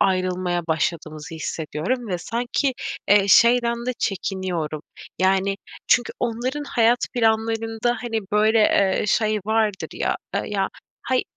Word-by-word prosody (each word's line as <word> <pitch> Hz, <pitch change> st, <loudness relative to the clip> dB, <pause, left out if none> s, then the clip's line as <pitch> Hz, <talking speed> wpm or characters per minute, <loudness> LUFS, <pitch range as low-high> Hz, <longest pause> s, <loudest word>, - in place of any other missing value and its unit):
ayrılmaya 185 Hz, -2 st, +1 dB
başladığımızı 160 Hz, 0 st, -2 dB
hissediyorum. 160 Hz, +10 st, -3 dB
Ve 180 Hz, -2 st, -1 dB
sanki, 240 Hz, -, -1 dB, 0.4 s
eee, 200 Hz, 0 st, +5 dB
şeyden 235 Hz, +1 st, +4 dB
de 255 Hz, -, 0 dB
çekiniyorum. 180 Hz, -6 st, -2 dB, 0.4 s
Yani 195 Hz, +1 st, +2 dB, 0.3 s
çünkü 245 Hz, -, +3 dB
onların 250 Hz, +5 st, -2 dB
hayat 240 Hz, -3 st, +3 dB, 0.2 s
planlarında, 225 Hz, 0 st, +1 dB
hani, 225 Hz, -2 st, -2 dB
böyle, 215 Hz, +2 st, +4 dB
eee, 200 Hz, -1 st, +3 dB
şey 215 Hz, +1 st, +2 dB
vardır 220 Hz, -3 st, 0 dB
ya, -, -, -1 dB, 0.2 s
eee, -, -, 0 dB
ya, 195 Hz, -2 st, -1 dB, 0.3 s
hay 255 Hz, +1 st, +1 dB
215 Hz, 120 wpm, -23 LUFS, 185-235 Hz, 0.4 s, eee